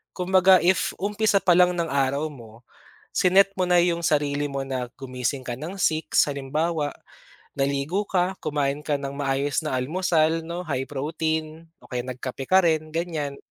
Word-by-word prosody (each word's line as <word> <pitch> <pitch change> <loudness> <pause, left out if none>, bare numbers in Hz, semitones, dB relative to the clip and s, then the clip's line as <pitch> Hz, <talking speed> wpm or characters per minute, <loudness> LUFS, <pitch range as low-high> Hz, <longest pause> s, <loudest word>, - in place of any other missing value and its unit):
Kumbaga, 185 +1 +5
if, 185 +1 +2
umpisa 210 0 +2
pa 180 -2 +5
lang 180 0 +5
ng 170 -1 0
araw 140 +2 0
mo, 115 -3 -14 0.5
si-net 195 +2 +4
mo 185 - +1
na 175 0 +5
yung 170 -1 +1
sarili 145 -1 +1
mo 135 0 -3
na, 130 -2 -3
gumising 130 0 -3
ka 120 - -3
ng 165 +6 -6
6:00 160 -3 +2
halimbawa, 145 +2 -1 0.7
naligo 140 +8 0
ka, 185 0 +1
kumain 145 -1 -1
ka 145 0 0
ng 140 -1 -4
maayos 140 0 0
na 150 -4 -1
almusal, 160 +3 +1
'no, 170 +2 -5
high 135 -3 -2
protein, 155 +2 -3 0.2
o - - -17
kaya 125 -2 -2
nagkape 130 +1 -5
ka 190 0 +5
rin, 155 -2 +1
ganiyan. 160 -4 -3
155 Hz, 165 wpm, -24 LUFS, 140-175 Hz, 0.7 s, Kumbaga